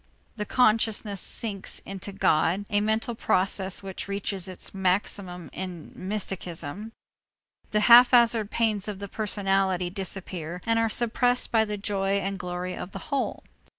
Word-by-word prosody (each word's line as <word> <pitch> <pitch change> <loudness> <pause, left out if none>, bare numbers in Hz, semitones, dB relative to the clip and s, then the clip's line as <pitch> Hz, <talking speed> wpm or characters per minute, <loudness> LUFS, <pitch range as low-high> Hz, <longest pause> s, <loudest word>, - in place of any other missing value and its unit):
The 210 -2 -4
consciousness 215 -4 +2
sinks 200 -4 -1
into 195 0 -6
God, 190 0 +2
a 205 0 +3
mental 220 +3 0
process 190 -2 0
which 190 0 -6
reaches 200 -2 -3
its 185 -1 -3
maximum 185 -2 -1
in 180 -3 -6
mysticism. 190 -1 -4 0.8
The 210 - +1
haphazard 235 -2 +7
pains 215 -4 0
of 210 -2 -4
the 200 +1 -6
personality 195 -3 0
disappear 180 -3 -3
and 230 0 +2
are 225 0 +2
suppressed 245 +2 +1
by 220 -1 +4
the 210 -1 -3
joy 195 -1 -1
and 200 0 -1
glory 180 0 -4
of 185 - -7
the - - -5
whole. 275 - -1
200 Hz, 140 wpm, -26 LUFS, 185-220 Hz, 0.8 s, haphazard